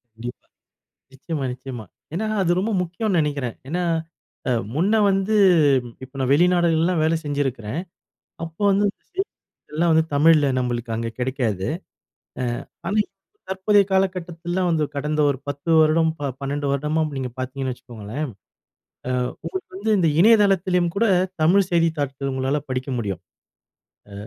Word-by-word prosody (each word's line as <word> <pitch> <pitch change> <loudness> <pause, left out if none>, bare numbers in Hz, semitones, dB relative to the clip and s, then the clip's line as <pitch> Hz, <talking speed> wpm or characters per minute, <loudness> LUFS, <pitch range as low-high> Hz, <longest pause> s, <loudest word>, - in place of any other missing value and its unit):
கண்டிப்பா. 120 +2 -8 0.7
நிச்சயமா, 140 +1 -4
நிச்சயமா. 125 -3 -7 0.3
ஏனா 215 +6 -1 0.2
அது 175 -2 +2
ரொம்ப 220 +3 -1
முக்கியோன்னு 180 +2 -1
நெனைக்கிறேன். 140 -5 -2
ஏனா, 180 +4 -1 0.7
அ - - +2 0.2
முன்ன 190 +8 +2 0.2
வந்து 195 +3 +1 0.7
இப்ப 130 +1 -17
நான் 130 - 0
வெளிநாடுகள்லலாம் 175 +1 +3
வேல 160 +1 +3
செஞ்சிருக்குறேன். 135 -3 -2 0.6
அப்போ 165 +4 -8
வந்து 200 +1 +3
இந்த - - -12
செய்தித்தாள்கள்லாம் 170 - -3
வந்து 160 0 +4
தமிழ்ல 150 0 +5
நம்மளுக்கு 120 -1 -2
அங்க 115 0 -2
கிடைக்காது. 125 -7 -1 0.7
அ 125 - 0 0.4
ஆனா 205 - -1
இப் - - -28 0.4
தற்போதைய 200 +1 +3
காலகட்டத்துல 180 -2 -1
வந்து 160 -3 +2
கடந்த 150 +2 -1
ஒரு 140 -2 0
10 145 +4 -3
வருடம் 160 +1 +4
ப 145 -1 -2
12 140 +1 -2
வருடமா 150 +3 0 0.2
நீங்க 130 -2 -3
பார்த்தீங்கன்னு 130 0 -3
வச்சுக்கோங்களேன், 120 +3 -6 0.8
அ - - 0 0.3
உங்களுக்கு 380 +3 -5
வந்து 220 - -1
இந்த 165 -3 +3
இணையதளத்துலயும் 190 -5 +4
கூட, 230 - +3 0.4
தமிழ் 185 +4 +4
செய்தித்தாள்கள் 145 -5 0
உங்களால 135 +2 0
படிக்க 130 +1 -3
முடியும். 95 -5 -3 0.9
அ - - -12
155 Hz, 135 wpm, -23 LUFS, 130-180 Hz, 0.9 s, தமிழ்ல